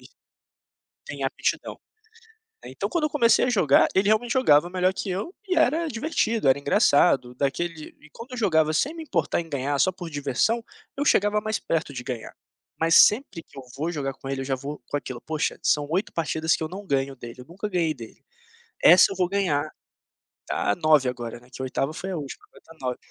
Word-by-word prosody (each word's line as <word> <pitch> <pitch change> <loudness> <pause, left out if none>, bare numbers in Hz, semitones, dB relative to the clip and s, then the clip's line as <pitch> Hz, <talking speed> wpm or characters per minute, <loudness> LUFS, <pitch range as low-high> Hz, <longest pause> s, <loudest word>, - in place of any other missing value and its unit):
e - - -15 1.0
tem - - -6
aptidão. - - -2 0.9
Ai - - -9
então - - -3
quando 340 -4 -1
eu 305 - +1
comecei 245 -5 +3
a - - 0
jogar, 170 - +4
ele 195 +2 +2
realmente 220 +2 +2
jogava 175 - +4
melhor 185 0 +2
que 195 - -5
eu 200 - -4
e 370 - 0
era 320 +1 +2
divertido, 230 - -1
era 135 - +5
engraçado, 135 -3 +3
daquele 155 +4 -3
e 150 - -18
quando 240 +3 -11
eu 250 - -6
jogava 160 -8 +2
sem 295 - 0
me 325 - -7
importar 170 - -1
em 165 - -12
ganhar 140 0 -1
só 185 - +3
por 180 -2 -8
diversão, 145 - 0 0.3
eu 285 - 0
chegava 205 -4 +3
mais 215 0 -2
perto 160 -3 -2
de 125 - -5
ganhar, 125 -4 -6 0.5
mas 165 0 +3
sempre 210 - +4
que - - -23
eu - - -6 0.2
vou 160 +4 -2
jogar 140 -4 -3
com 135 - -11
ele, 135 -1 -3
eu 135 - -5
já 135 - -1
vou 140 +2 -7
com - - -4
aquilo: 130 -3 -7
"Poxa, 155 -1 -2
são 145 -1 +2
8 185 +5 -1
partidas 160 -1 0
que - - -5
eu 155 - -4
não 195 +2 -9
ganho 135 0 -1
dele, 120 +1 -10
eu 125 - -13
nunca 190 +7 -6
ganhei 170 -4 0
dele, 115 -5 -13 0.6
essa 185 - +7
eu - - -4
vou 180 -1 +2
ganhar", 175 -6 0 0.8
ta 105 - 0
9 150 -2 +3
agora, 120 -2 -5
né, 120 - -21
que 130 - -8
a - - -2
8ª 135 +3 -2
foi 190 - -6
a 180 - -3
última, 145 -3 -7
vai - - -17
dar 165 - -16
9. 125 -1 -2
160 Hz, 215 wpm, -25 LUFS, 140-205 Hz, 1.0 s, essa